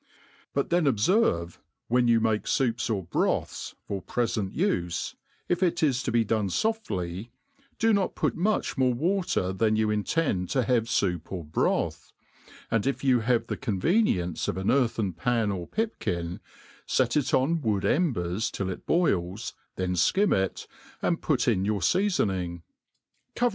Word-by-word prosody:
But 140 - 0
thenobferve, 135 - +2 0.3
when 125 +1 +3
you 115 -1 +5
make 110 -1 0
foups 120 -2 0
or 100 -3 -1
broths 85 - -1
for 100 -2 -3
prefent 115 -5 -2
ufe, 90 - -1 0.3
if 175 +1 0
it 175 -3 +1
is 135 -4 +2
to 120 - -2
be 115 -1 +2
dorfe 110 0 +1
foftly, 100 - -2 0.5
do 225 0 +3
not 200 -2 +1
put - - 0
much 200 -4 0
more 130 -2 +3
water 170 - 0
than 110 +2 +2
you 110 0 +1
intend 105 - 0
to 130 - +1
have 120 -1 +2
fOup 90 -7 -1
or 90 -3 -4
broth; 75 - -1 0.6
and 115 +1 +1
if 135 - -1
you 130 -3 +4
have 115 0 +1
the - - -3
con 105 -8 -2
venience 100 - +1
of - - -2
an 95 +1 +1
earthen 115 -7 +1
pan 110 +4 0
or 90 -3 -4
pipkin, 90 - -2 0.5
fet 125 -3 +1
it 150 -3 +1
on 155 +6 +2
wood 105 -5 0
embers 110 - +1
till 95 -1 -3
it - - -9
boils, 100 - 0 0.2
then 90 -1 -1
fkim 190 - +3
it, 95 0 -1 0.4
and 170 - +1
put 135 -6 +1
in 100 -6 +2
your 105 0 0
feafoning; 95 - 0 0.7
cover 245 0 +3
115 Hz, 160 wpm, -27 LUFS, 95-145 Hz, 0.7 s, you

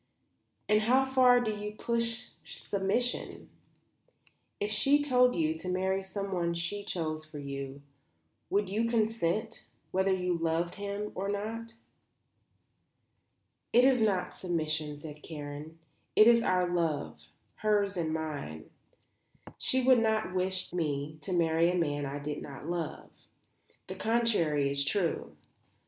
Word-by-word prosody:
"And 210 0 +4
how 255 +5 +4
far 255 -2 +5
do 230 -3 0
you 210 0 -5
push 235 +1 -1
submission? 200 +5 -2 1.1
If 205 +1 -1
she 275 +7 +4
told 250 -3 +4
you 160 -2 +1
to 180 - -5
marry 190 +1 0
someone 190 -3 -2
she 175 +5 -3
chose 155 -5 -3
for 155 -1 -10
you, 140 0 -6 0.7
would 205 0 +1
you 215 +5 0
consent, 220 -2 0 0.3
whether 190 +1 +2
you 180 -1 +1
loved 165 +1 0
him 205 +1 -3
or 195 +2 -3
not?" 225 +3 -4 2.0
"It 245 +2 +7
is 260 -3 +4
not 200 -4 +1
submission," 155 -4 -2
said 150 -1 -9
Karen. 150 +1 -8 0.4
"It 215 - +8
is 235 -1 +7
our 180 -5 +2
love, 155 - -2 0.3
hers 205 -2 +1
and 165 -3 -1
mine. 150 - -5 0.9
She 260 0 +3
would 255 -1 +6
not 220 -4 +1
wish 185 -1 0
me 155 -3 -2
to 195 - -5
marry 165 -1 +3
a - - -1
man 145 -4 0
I 140 +1 -4
did 145 +1 -4
not 140 +1 -8
love. 170 -2 -4 0.7
The 185 - -6
contrary 190 -9 +2
is 140 0 +1
true. 170 +3 -1
185 Hz, 130 wpm, -30 LUFS, 155-215 Hz, 2.0 s, It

